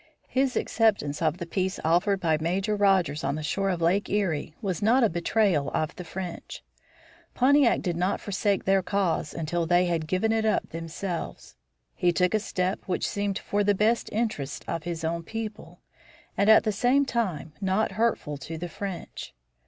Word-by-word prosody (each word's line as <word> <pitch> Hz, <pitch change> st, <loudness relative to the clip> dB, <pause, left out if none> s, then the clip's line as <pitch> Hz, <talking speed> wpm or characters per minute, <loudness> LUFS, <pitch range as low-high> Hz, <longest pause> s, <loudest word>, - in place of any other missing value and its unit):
His 260 Hz, 0 st, +1 dB
acceptance 200 Hz, -11 st, +1 dB
of 160 Hz, 0 st, +1 dB
the 175 Hz, -, -5 dB
peace 185 Hz, +2 st, -2 dB
offered 180 Hz, +5 st, +2 dB
by 165 Hz, -4 st, +2 dB
Major 190 Hz, +6 st, 0 dB
Rogers 190 Hz, -7 st, +2 dB
on 140 Hz, +1 st, 0 dB
the 155 Hz, -, -5 dB
shore 195 Hz, +5 st, 0 dB
of 175 Hz, -3 st, -1 dB
Lake 190 Hz, +5 st, +2 dB
Erie 170 Hz, -7 st, -1 dB
was 190 Hz, -7 st, -3 dB
not 235 Hz, +5 st, +4 dB
a 225 Hz, -, +4 dB
betrayal 170 Hz, -3 st, +1 dB
of 155 Hz, +1 st, -1 dB
the 180 Hz, -, -7 dB
French. 175 Hz, 0 st, -7 dB, 0.7 s
Pontiac 275 Hz, 0 st, +4 dB
did 175 Hz, -3 st, -1 dB
not 180 Hz, +4 st, 0 dB
forsake 200 Hz, 0 st, -1 dB
their 195 Hz, 0 st, +3 dB
cause 185 Hz, -5 st, -1 dB
until 165 Hz, +1 st, -2 dB
they 175 Hz, +1 st, +4 dB
had 165 Hz, -3 st, -1 dB
given 190 Hz, +6 st, +1 dB
it 225 Hz, 0 st, +1 dB
up 220 Hz, -, +1 dB
themselves. 165 Hz, -, -5 dB, 0.4 s
He 175 Hz, -, +2 dB
took 180 Hz, +2 st, +1 dB
a 215 Hz, -, +3 dB
step 185 Hz, -2 st, -2 dB
which 185 Hz, -, -1 dB
seemed 200 Hz, -1 st, -2 dB
for 205 Hz, 0 st, -1 dB
the 205 Hz, 0 st, +3 dB
best 220 Hz, +4 st, +1 dB
interests 210 Hz, -, -2 dB
of 165 Hz, -1 st, -3 dB
his 170 Hz, -1 st, -4 dB
own 165 Hz, +1 st, -1 dB
people, 220 Hz, +3 st, -7 dB, 0.5 s
and, 200 Hz, -, +2 dB
at 220 Hz, -, +7 dB
the 215 Hz, -, +1 dB
same 250 Hz, +7 st, +2 dB
time, 180 Hz, -, -2 dB
not 195 Hz, +3 st, +1 dB
hurtful 205 Hz, -8 st, -1 dB
to 160 Hz, +4 st, -7 dB
the 175 Hz, +2 st, -5 dB
French. 190 Hz, -, -7 dB
190 Hz, 180 wpm, -27 LUFS, 165-210 Hz, 0.7 s, at